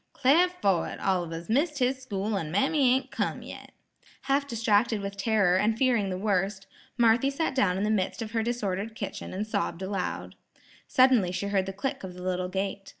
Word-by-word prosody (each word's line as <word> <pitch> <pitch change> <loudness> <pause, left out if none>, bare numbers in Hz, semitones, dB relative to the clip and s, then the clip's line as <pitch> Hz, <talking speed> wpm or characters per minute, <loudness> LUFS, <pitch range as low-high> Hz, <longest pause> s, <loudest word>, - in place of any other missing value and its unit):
"'Clar 300 +7 +4
fo' 200 - +1
it, - - -6
Oliver's 170 -3 -1
missed 290 +6 +1
his 260 0 0
school, 210 -3 -2
an' 165 -6 -2
mammy 260 - +3
ain't 265 - -3
come - - -2
yet." - - -10 0.5
Half 280 +1 0
distracted 225 -2 +2
with 200 0 -5
terror 200 -3 +2
and 215 +3 +1
fearing 235 -6 +2
the 185 - -3
worst, 195 0 -1 0.3
Marthy 235 +2 +4
sat 280 +1 -1
down 195 -8 +2
in 195 - -1
the 210 - +1
midst 195 0 0
of 220 - -7
her 225 -1 0
disordered 220 -2 -2
kitchen 200 - -6
and 200 +3 -3
sobbed 200 -4 -2
aloud. 190 -1 -3 0.5
Suddenly 255 -8 +4
she 200 +2 -3
heard 195 -2 +1
the - - -2
click 200 +6 -4
of 185 -1 -7
the 180 - -9
little 180 0 -1
gate. 195 +1 -3
205 Hz, 195 wpm, -27 LUFS, 190-250 Hz, 0.5 s, Clar